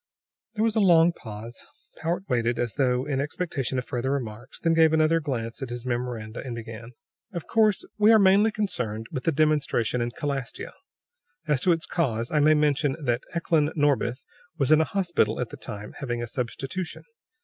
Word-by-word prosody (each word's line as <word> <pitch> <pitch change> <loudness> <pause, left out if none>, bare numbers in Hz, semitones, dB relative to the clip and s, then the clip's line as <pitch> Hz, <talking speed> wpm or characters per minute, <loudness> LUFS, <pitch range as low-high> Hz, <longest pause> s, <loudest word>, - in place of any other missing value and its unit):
There 215 - +1
was 225 -1 +1
a - - +3
long 175 -4 +6
pause. 115 -3 -9 0.3
Powart 175 +4 -2
waited, 120 -2 +1
as 120 -2 -1
though 125 -2 +1
in 135 -2 -1
expectation 145 -3 -2
of 125 - -2
further 125 +1 -2
remarks, 125 -2 -4
then 165 -1 +2
gave 160 -1 +5
another 160 +1 +4
glance 125 -6 -4
at 135 - -4
his 120 0 -5
memoranda 120 -3 -3
and 125 -3 -5
began: 115 +1 -8 0.4
"Of 170 - -5
course, 215 -3 +2
we 210 +1 +6
are 225 - +8
mainly 200 +2 +5
concerned 125 - -3
with 130 -4 -4
the 165 - +3
demonstration 145 -6 +1
in 120 - 0
Calastia. 135 0 -4 0.7
As 150 -5 +1
to 180 - +3
its 165 -1 0
cause, 120 -8 -1
I 150 - +2
may 155 +1 +5
mention 145 -2 +2
that 120 -4 0
Eklan 160 -2 +1
Norbith 145 -4 +1 0.3
was 140 -2 +1
in 155 0 +7
a - - +2
hospital 175 - 0
at 125 -2 -2
the - - -9
time, 105 0 -8
having 120 -4 -3
a - - -4
substitution. 135 +8 -4
140 Hz, 185 wpm, -26 LUFS, 120-165 Hz, 0.7 s, are